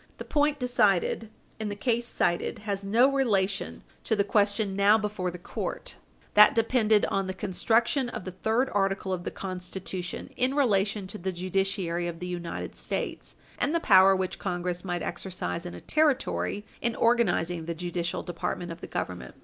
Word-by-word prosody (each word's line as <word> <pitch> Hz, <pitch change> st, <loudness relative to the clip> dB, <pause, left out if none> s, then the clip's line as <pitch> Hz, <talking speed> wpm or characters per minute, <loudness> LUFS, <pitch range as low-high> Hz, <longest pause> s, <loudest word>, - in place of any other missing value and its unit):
The -, -, -7 dB
point 295 Hz, -1 st, +2 dB
decided 225 Hz, -4 st, +2 dB, 0.3 s
in 215 Hz, -1 st, -2 dB
the 205 Hz, -, -4 dB
case 235 Hz, +2 st, 0 dB
cited 175 Hz, -6 st, 0 dB
has 200 Hz, -2 st, -2 dB
no 235 Hz, +7 st, +4 dB
relation 205 Hz, -8 st, 0 dB, 0.2 s
to 220 Hz, -, +1 dB
the 200 Hz, -, +2 dB
question 205 Hz, 0 st, +1 dB
now 200 Hz, +2 st, +5 dB
before 210 Hz, -4 st, -2 dB
the 180 Hz, -, -7 dB
court. 175 Hz, -, -5 dB, 0.4 s
That 210 Hz, 0 st, +8 dB
depended 225 Hz, -2 st, +3 dB
on 195 Hz, -1 st, -1 dB
the 190 Hz, -, -4 dB
construction 225 Hz, +7 st, +1 dB
of 185 Hz, -, -6 dB
the 185 Hz, -, -4 dB
third 220 Hz, +8 st, 0 dB
article 195 Hz, -1 st, 0 dB
of 175 Hz, -1 st, -4 dB
the -, -, -1 dB
Constitution, 185 Hz, -1 st, -6 dB
in 255 Hz, +2 st, +1 dB
relation 205 Hz, -7 st, +2 dB
to 200 Hz, +3 st, -8 dB
the 190 Hz, +2 st, -2 dB
judiciary 185 Hz, -1 st, -1 dB
of 170 Hz, -1 st, -5 dB
the 180 Hz, -, -6 dB
United 175 Hz, -1 st, -5 dB
States, -, -, -5 dB, 0.2 s
and 295 Hz, +4 st, +1 dB
the -, -, +3 dB
power 195 Hz, -8 st, +6 dB
which 190 Hz, 0 st, -2 dB
Congress 180 Hz, -1 st, -3 dB
might 175 Hz, -2 st, -3 dB
exercise 180 Hz, -1 st, -4 dB
in 175 Hz, -, -7 dB
a -, -, -9 dB
Territory 275 Hz, -8 st, +1 dB, 0.2 s
in 235 Hz, -1 st, 0 dB
organizing 180 Hz, -8 st, +2 dB
the 170 Hz, 0 st, -3 dB
judicial 175 Hz, 0 st, -3 dB
department 175 Hz, 0 st, -4 dB
of 165 Hz, -, -9 dB
the -, -, -7 dB
Government. 60 Hz, 0 st, -5 dB
195 Hz, 175 wpm, -28 LUFS, 180-225 Hz, 0.4 s, That